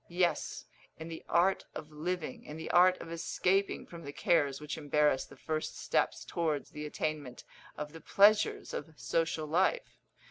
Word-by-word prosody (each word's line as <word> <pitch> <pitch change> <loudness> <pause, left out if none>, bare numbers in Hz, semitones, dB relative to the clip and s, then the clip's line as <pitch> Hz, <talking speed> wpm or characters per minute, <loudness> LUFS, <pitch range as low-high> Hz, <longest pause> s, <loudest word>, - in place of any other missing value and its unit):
Yes, 175 0 0 0.3
in 160 +1 -7
the 165 - -7
art 185 +3 +3
of 155 0 -7
living 155 -1 -4
in 150 - -8
the 160 - -4
art 180 +1 +6
of 165 - -8
escaping 185 +4 0
from 170 -1 -10
the 140 - -6
cares 140 -3 +2
which 150 -1 -5
embarrass 150 -2 +2
the - - -15
first 155 -1 -3
steps - - 0
towards 155 -4 -1
the 150 0 -5
attainment 150 -4 -4 0.3
of 150 0 -5
the 165 - -10
pleasures 210 +2 +4
of 150 -1 -6
social 160 +5 0
life. 185 - +1
160 Hz, 165 wpm, -32 LUFS, 150-175 Hz, 0.3 s, art